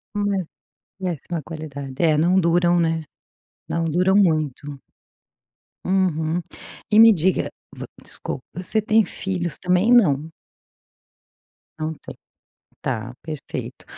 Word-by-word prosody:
É, 200 -3 0 0.5
péssima 175 -3 -4
qualidade. 145 -4 -7
É, 160 -2 +4
não 180 +4 +4
duram, 175 0 +3
né. 165 -1 +1 0.7
Não 165 - -1
duram 180 +4 +2
muito. 155 -7 +1 1.1
Uhum. 175 -3 +1 0.5
E 215 - +6
me 225 -1 +9
diga 185 +2 +1 0.5
desculpa, 130 - -5
você 185 +5 0
tem 220 +1 +4
filhos 180 -4 -3
também, 180 +5 +2
não? 160 - +4 1.5
Não 155 +1 -2
tem. - - -11 0.7
Tá 120 -1 -3
perfeito. 155 -3 -7
170 Hz, 105 wpm, -22 LUFS, 155-190 Hz, 1.5 s, me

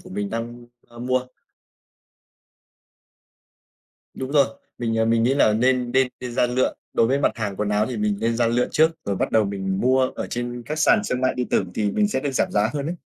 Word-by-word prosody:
của - - -14
mình 100 +1 -3
đang, 120 +1 -5 0.2
ơ, 120 - -15
mua. 130 +1 -1 2.9
Đúng 130 0 -5
rồi. 140 -3 +5 0.3
Mình, 115 -2 -1
ờ, 110 - +2
mình 115 0 +2
nghĩ 125 +4 +2
là 140 -6 +4
nên 125 +2 +1
nên 130 0 +3
nên 125 -1 -5
ra 120 - +2
lựa, 125 +1 0 0.2
đối 115 - +4
với 135 +4 +1
mặt - - +2
hàng 105 -4 -4
quần 105 +1 -1
áo 105 +1 +1
thì 125 - -4
mình 105 -1 0
nên 115 0 0
ra 120 0 +2
lựa 120 +2 +1
trước, 160 +1 +4
rồi 100 - -2
bắt - - -1
đầu 110 -1 +4
mình 95 -1 -3
mua 130 +1 +3
ở - - -4
trên 120 0 -4
các 155 +1 -4
sàn 210 +7 +4
xương 125 -10 -2
mại 130 - +1
điện 125 -1 -3
tử - - +1
thì 105 -2 0
mình 210 - +1
sẽ 170 - -1
được 145 - -2
giảm - - +1
giá 105 +2 +2
hơn 145 -1 -3
ấy. 170 +3 -3
120 Hz, 230 wpm, -23 LUFS, 110-130 Hz, 2.9 s, rồi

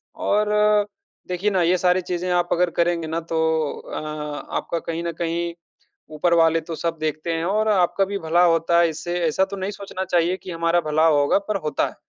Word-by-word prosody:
और 210 0 +1 0.8
देखिए 180 +3 0
ना 190 -2 +1
ये 175 +2 +3
सारी 180 +1 +3
चीज़ें 180 0 -3
आप 175 0 +1
अगर 180 +1 +2
करेंगे 170 -1 +1
ना 160 +1 -2
तो 160 - +1 0.4
अ, - - -8 0.6
आपका 170 - -3
कहीं 165 +1 -4
न 170 - -2
कहीं 170 0 -2 0.6
ऊपर 170 +3 +2
वाले 165 -1 +4
तो 165 +1 -7
सब 165 0 -2
देखते 155 +2 -2
हैं 165 0 -2
और 215 +4 +1
आपका 195 -1 +2
भी 200 +1 -4
भला 170 +1 +2
होता 170 0 +3
है 170 - +4
इससे। 170 +3 -4
ऐसा 190 +5 +2
तो - - -3
नहीं 190 +1 -3
सोचना 195 -2 -6
चाहिए 175 0 +1
कि 185 - -6
हमारा 170 +1 +1
भला 155 +1 +2
होगा, 145 0 +3
पर 200 +1 -3
होता 150 - 0
है। - - -13
170 Hz, 205 wpm, -22 LUFS, 165-185 Hz, 0.8 s, वाले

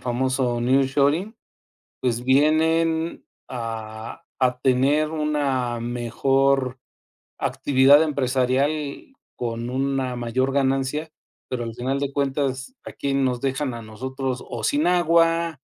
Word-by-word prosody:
famoso 125 -1 0
nearshoring, 140 - +2 0.7
pues 120 -1 -1
vienen 160 +4 +2 0.2
a 115 +3 -6 0.2
a 125 -1 +1
tener 140 +4 +2
una 140 -6 -1
mejor 130 +2 0 0.6
actividad 140 +2 +4
empresarial 140 - -1 0.2
con 120 0 -3
una 130 -1 -1
mayor 125 +3 0
ganancia, 135 +3 0 0.4
pero 125 -2 -3
al 115 -1 -5
final 130 +3 -2
de 140 -1 -2
cuentas, 135 - -2
a - - -8
quién 140 -1 -1
nos 125 -2 0
dejan 135 0 -2
a 115 - -6
nosotros 130 +4 -5
o 115 -2 -4
sin 145 +7 +1
agua, 170 -3 +2
135 Hz, 110 wpm, -23 LUFS, 125-145 Hz, 0.7 s, actividad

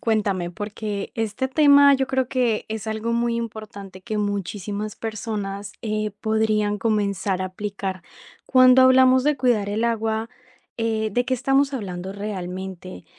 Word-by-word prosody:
cuéntame, 200 -6 0
porque 205 +1 -5
este 225 +3 -2
tema 285 0 +6
yo 265 -1 +1
creo 265 -1 0
que 245 -4 0
es 220 -1 -5
algo 220 +1 -2
muy 235 0 0
importante 205 -4 -7
que 215 +3 -4
muchísimas 205 +1 -3
personas, 205 -3 -5
eh, 215 -1 -2
podrían 215 -1 +1
comenzar 200 -3 0
a - - -1
aplicar. 190 -1 -5 0.4
Cuando 255 0 +6
hablamos 260 0 +6
de 295 +1 +2
cuidar 240 -6 +1
el 215 +3 -1
agua, 225 0 -1 0.5
eh, 220 -1 -1
¿de 245 +4 +1
qué 260 - +1
estamos 270 +2 +1
hablando 190 -5 -5
realmente? 190 -2 -6
215 Hz, 140 wpm, -23 LUFS, 200-240 Hz, 0.5 s, tema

